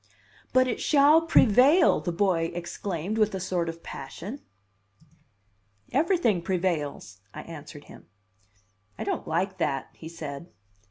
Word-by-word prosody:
"But 255 0 +4
it 240 - -3
shall 300 +2 +5
prevail!" 290 - +5
the 175 - -3
boy 170 -2 +1
exclaimed 175 +3 -4
with 215 -2 +2
a - - -3
sort 180 -2 -2
of 165 0 -9
passion. 190 - -8 1.5
"Everything 280 - +2
prevails," 160 - -3
I - - -7
answered 150 -2 -10
him. - - -15 0.9
"I - - -4
don't - - -3
like 185 +3 -1
that," 135 -5 -1
he 160 - -10
said. 155 -1 -7
180 Hz, 125 wpm, -26 LUFS, 165-235 Hz, 1.5 s, shall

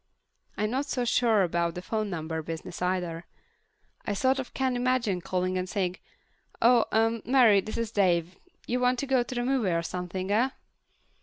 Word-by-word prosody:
I'm 210 +1 0
not 270 +3 -1
so 250 -3 -1
sure 230 -4 +3
about 170 -1 0
the 180 - -5
phone 215 +1 -2
number 160 -2 -3
business 165 +2 -7
either. 180 -2 -2 0.8
I 205 - -2
sort 260 +5 +2
of 260 - -5
can't 260 -1 -1
imagine 245 -7 0
calling 185 +1 -1
up - - 0
and 185 0 -4
saying, 185 -2 -1 0.6
"Oh, 235 0 +5
uh, 225 +1 +2
Mary, 235 -6 +5
this 215 - -6
is 230 -2 -2
Dave. 180 -4 +1 0.3
You 250 - -1
want 250 0 +2
to 280 - -2
go 265 -2 +2
to 240 0 -4
a - - 0
movie 255 -6 +1
or 170 -1 0
something, 180 +2 -4
huh?" 225 +6 +3
210 Hz, 185 wpm, -28 LUFS, 180-245 Hz, 0.8 s, Oh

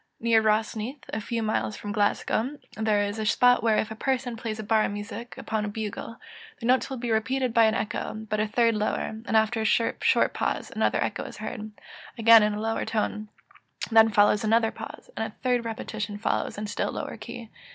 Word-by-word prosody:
Near 230 -1 +4
Rosneath, 220 +4 -1
a 220 - -3
few 230 +1 -2
miles 215 0 -1
from 205 - -6
Glasgow, 220 +6 0 0.2
there 215 -2 +1
is 205 +2 -3
a 215 - -2
spot 245 +2 +4
where, 225 -2 +3
if 220 - -1
a - - -5
person 250 0 -1
plays 225 -1 -4
a 220 - -5
bar 215 +1 +3
of - - -1
music 205 +3 -7
upon 220 -1 -2
a - - -2
bugle, 215 +2 -5 0.4
the - - -6
notes 255 +3 +3
will 265 - -4
be 240 -1 -3
repeated 250 +3 0
by 230 -1 +6
an 220 0 +2
echo, 215 - -3
but 215 0 -1
a 215 - +1
third 230 +1 +3
lower; 215 +1 -2
after 220 +1 +2
a - - 0
short 230 +1 +2
pause, - - -2
another - - +2
echo - - -3
is - - -9
heard, 215 -2 -6 0.5
again 230 0 +8
in 210 0 +1
a - - -4
lower 225 +1 -1
tone; 215 -1 -2 0.6
then 225 0 +7
follows 205 0 +4
another 225 +1 +3
pause, - - -10
and - - -2
a - - -30
third 245 -2 +1
repetition 215 -2 -4
follows 210 - -1
in 210 - -4
a - - -3
still 205 - -2
lower - - -5
key. 235 -2 -9
220 Hz, 210 wpm, -26 LUFS, 215-230 Hz, 0.6 s, again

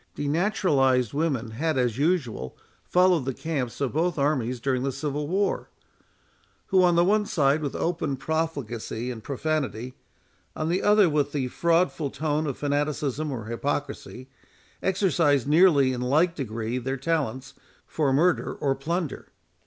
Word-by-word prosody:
Denaturalized 145 - +1
women 140 -7 -1
had 155 +6 -1
as 125 -1 0
usual 145 - -1 0.3
followed 180 -5 +3
the 135 -2 -2
camps 140 -7 -3
of 140 -3 -1
both 170 +3 0
armies 130 -4 0
during 130 0 0
the 135 +1 -1
Civil 145 +2 -3
War; 195 +4 -1 1.0
who, 190 -1 +4
on 175 -1 +4
the 170 +1 +4
one 210 +2 +2
side 145 -1 +2
with 145 -3 -3
open 160 -5 -1
profligacy 135 -6 -3
and 110 -3 -8
profanity, 135 -3 -2 0.6
on 155 +1 -2
the 180 +3 +1
other 210 -2 +5
with 145 -2 0
the 135 -4 -1
fraudful 170 -1 +1
tone 150 +2 -1
of 135 - -3
fanaticism 145 0 -1
or 115 -5 -5
hypocrisy, 135 +1 -4 0.5
exercised 170 - +2
nearly 150 -4 +5
in 125 - -4
like 155 +7 +2
degree 115 -3 -3
their 135 +2 -3
talents, 135 -3 -2 0.3
for 150 -4 0
murder 170 +7 +2
or 140 -2 0
plunder. 165 +2 -3
145 Hz, 145 wpm, -26 LUFS, 130-165 Hz, 1.0 s, other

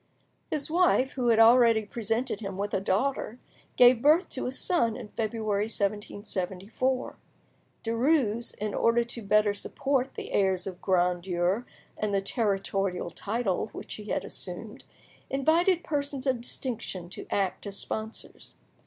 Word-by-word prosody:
His 300 -2 -1
wife, 335 -6 +3
who 250 -3 -2
had 230 -2 +5
already 230 -1 +6
presented 225 +1 -2
him 195 -3 -5
with 205 +1 -3
a - - +2
daughter, 235 +4 0 0.4
gave 245 -1 +7
birth 310 +7 +4
to 260 - -3
a - - -2
son 260 -5 +1
in 235 -4 -8
February 215 -2 -1
1774. 205 +3 -2 0.7
Derues, 235 -1 +1
in 210 0 -3
order 235 +1 +3
to 235 0 -6
better 210 0 +3
support 270 +5 -1
the - - -6
airs 190 -2 +2
of 185 -2 -7
grandeur 180 +3 +1 0.3
and 210 -1 -1
the - - +3
territorial 195 -3 -1
title 210 -2 -1
which - - -7
he 210 - -8
had - - -2
assumed, - - -5 0.4
invited 330 +6 +3
persons 285 -2 -2
of 255 -3 +1
distinction 225 -8 -4
to - - -8
act 195 +1 -1
as 200 0 -4
sponsors. 220 +1 -6
220 Hz, 140 wpm, -28 LUFS, 200-255 Hz, 0.7 s, gave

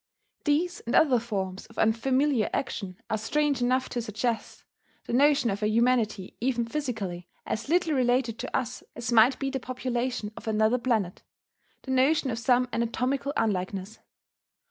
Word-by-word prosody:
These 335 +4 +1
and 235 - 0
other 265 -6 +5
forms 195 -5 -4
of 225 - -19
unfamiliar 255 +2 +2
action 195 -7 -3
are 220 - -1
strange 285 +3 0
enough 255 +1 +2
to 240 - -2
suggest 225 +1 -3 0.4
the - - -5
notion 280 -2 +4
of 195 - -4
a 210 - +2
humanity 220 -4 +1
even 240 -1 +1
physically 220 - -4 0.2
as 220 - -3
little 345 -1 +2
related 245 -3 +1
to 255 - -2
us 255 -3 -4
as 240 +1 -3
might 235 +3 +6
be 275 -1 -2
the 265 - -2
population 250 -3 -3
of - - -10
another 220 +3 +2
planet, 220 -7 0 0.6
the 265 - -5
notion 265 +1 +3
of 230 - -3
some 250 +2 +3
anatomical 250 +4 -1
unlikeness. 195 0 -2
240 Hz, 155 wpm, -27 LUFS, 220-260 Hz, 0.6 s, might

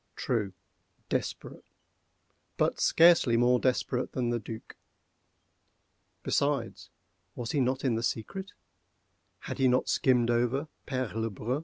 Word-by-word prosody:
True—desperate: 100 -6 -5 0.9
but - - +1
scarcely 165 -8 +5
more 125 +1 +4
desperate 125 0 -1
than 120 -2 -1
the 120 - 0
Duc. 110 +1 -9 1.5
Besides, 140 -5 -1 0.5
was 120 -2 -4
he 145 - 0
not 130 +1 0
in 125 - +2
the 115 - -1
secret?—had 190 - -8
he 135 - +4
not 125 0 +2
skimmed 120 -3 +3
over 125 +5 0 0.2
Père 130 -4 -2
Le 115 +1 -1
Brun? 115 +7 -3
125 Hz, 115 wpm, -29 LUFS, 115-130 Hz, 1.5 s, scarcely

